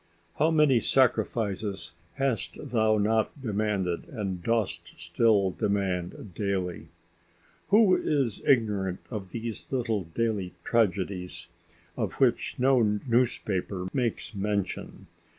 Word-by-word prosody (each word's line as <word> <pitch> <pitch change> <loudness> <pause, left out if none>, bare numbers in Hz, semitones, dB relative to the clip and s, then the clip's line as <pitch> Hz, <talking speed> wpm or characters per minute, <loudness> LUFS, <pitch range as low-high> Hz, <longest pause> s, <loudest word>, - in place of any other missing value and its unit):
How 155 - +4
many 150 -6 +4
sacrifices 110 -6 0 0.2
hast 135 -8 -1
thou 110 -2 +3
not 110 +6 +1
demanded 105 -7 -1
and 95 -7 -4
dost 90 -5 -1
still 100 +3 +2
demand 95 -2 -2
daily! 95 -2 -2 0.8
Who 205 -2 +6
is 135 -8 0
ignorant 105 -7 +2
of 100 -5 -5
these 115 0 -5
little 115 -7 -1
daily 105 -6 -1
tragedies 95 -5 0 0.5
of - - -2
which - - +1
no 130 0 +4 0.2
newspaper 105 -6 0
makes 120 -5 -1
mention! 100 -1 -3
105 Hz, 100 wpm, -28 LUFS, 95-120 Hz, 0.8 s, Who